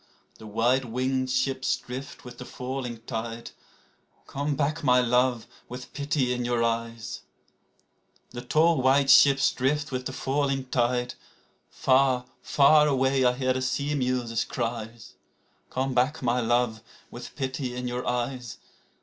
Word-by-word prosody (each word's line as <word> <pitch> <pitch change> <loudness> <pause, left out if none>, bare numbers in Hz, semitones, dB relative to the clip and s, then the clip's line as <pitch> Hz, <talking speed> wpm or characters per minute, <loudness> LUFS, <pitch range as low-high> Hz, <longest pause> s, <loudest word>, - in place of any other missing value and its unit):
The 110 - -10
white 120 +5 +1
winged 130 +2 -1
ships 130 0 0
drift 130 +2 -9
with 125 -1 -11
the - - -6
falling 125 -2 -6
tide, 115 -1 -5 0.7
Come 145 +1 -3
back, 155 +3 -1
my 125 -2 +5
love, 125 -1 +2 0.2
with 125 +1 -9
pity 140 -3 0
in 125 0 -2
your 120 -1 0
eyes! 115 -1 -3 1.1
The 120 - -6
tall 155 +4 +2
white 135 +1 +4
ships 135 0 +6
drift 145 +3 -1
with 130 0 -3
the - - -5
falling 135 0 -1
tide. 125 -1 0 0.6
(Far, 130 -1 +2 0.2
far 150 +1 +5
away 135 -1 +2
I 125 0 +4
hear 130 0 0
the 130 - -2
seamews' 130 -4 -1
cries.) 115 -1 -5 0.6
Come 130 +1 -2
back, 130 +4 +1
my 120 0 +1
love, 120 -1 0 0.3
with - - -9
pity 130 -1 -3
in 125 0 -4
your 125 0 -4
eyes 125 0 -3
125 Hz, 140 wpm, -26 LUFS, 120-135 Hz, 1.1 s, ships